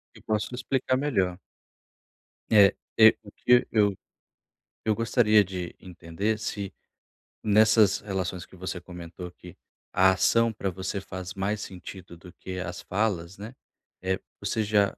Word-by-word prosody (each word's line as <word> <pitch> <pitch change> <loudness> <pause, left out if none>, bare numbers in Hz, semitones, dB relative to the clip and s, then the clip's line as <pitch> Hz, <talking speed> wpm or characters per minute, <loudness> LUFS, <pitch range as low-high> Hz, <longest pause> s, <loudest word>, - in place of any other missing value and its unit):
E - - -14
posso 110 +3 -2
explicar 130 0 0
melhor. 95 -11 0 1.1
É 100 -3 +7 0.3
é 110 0 +9
o 100 - -13
que 125 0 +3
eu 100 -3 +3 0.9
eu 110 -1 +1
gostaria 110 -2 +4
de 90 -2 -6
entender 95 +4 -3
se 100 -2 -4 0.7
nessas 110 -1 +5
relações 95 -3 -3
que - - -17
você 95 0 -5
comentou 90 0 -9
aqui, 90 0 -14 0.3
a 95 +1 +5
ação 115 +4 +3
pra 100 -2 -2
você 95 +2 -4
faz 95 -1 -7
mais 100 +2 -2
sentido 90 -1 -9
do 90 +1 -14
que 95 -1 -7
as 90 -1 -5
falas, 95 -3 -1
né. 110 +5 -8 0.5
Eh, 95 +1 -1 0.2
você 105 +2 -1
já 100 -1 +2
100 Hz, 140 wpm, -27 LUFS, 90-110 Hz, 1.1 s, é